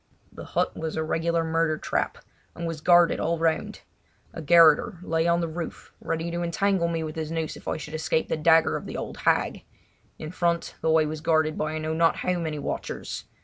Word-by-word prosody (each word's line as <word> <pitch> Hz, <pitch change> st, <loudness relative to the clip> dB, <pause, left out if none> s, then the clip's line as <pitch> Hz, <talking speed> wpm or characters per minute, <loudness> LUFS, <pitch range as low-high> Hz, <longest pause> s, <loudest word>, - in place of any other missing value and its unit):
The -, -, -10 dB
hut -, -, +1 dB
was 160 Hz, -1 st, -4 dB
a 160 Hz, -, -1 dB
regular 165 Hz, +1 st, 0 dB
murder 160 Hz, -1 st, 0 dB
trap, -, -, -2 dB, 0.4 s
and 170 Hz, -, -5 dB
was 165 Hz, -2 st, -4 dB
guarded 175 Hz, 0 st, +5 dB
all 170 Hz, +1 st, 0 dB
around. 160 Hz, 0 st, -1 dB, 0.5 s
A -, -, -6 dB
garroter 165 Hz, +4 st, +5 dB
lay 165 Hz, -1 st, 0 dB
on 170 Hz, 0 st, +2 dB
the 170 Hz, -, -1 dB
roof 165 Hz, +1 st, -7 dB
ready 165 Hz, +1 st, -3 dB
to 170 Hz, 0 st, -3 dB
entangle 175 Hz, +1 st, +1 dB
me 165 Hz, -1 st, -2 dB
with 155 Hz, -1 st, -6 dB
his 160 Hz, -1 st, -4 dB
noose 160 Hz, -1 st, -3 dB
if -, -, -13 dB
I -, -, -1 dB
should 155 Hz, 0 st, -8 dB
escape 160 Hz, 0 st, 0 dB
the -, -, -1 dB
dagger 160 Hz, +1 st, +4 dB
of -, -, -9 dB
the -, -, -5 dB
old -, -, -6 dB
hag. -, -, +1 dB, 0.5 s
In 155 Hz, 0 st, -7 dB
front 170 Hz, -1 st, -1 dB
the 160 Hz, -, 0 dB
way 160 Hz, -1 st, +4 dB
was 155 Hz, 0 st, -5 dB
guarded 155 Hz, -1 st, +2 dB
by 155 Hz, 0 st, -2 dB
I -, -, -2 dB
know 155 Hz, 0 st, -2 dB
not 165 Hz, +1 st, +3 dB
how 180 Hz, -1 st, -1 dB
many 160 Hz, -2 st, -3 dB
watchers. 145 Hz, -, -5 dB
165 Hz, 215 wpm, -26 LUFS, 155-170 Hz, 0.5 s, guarded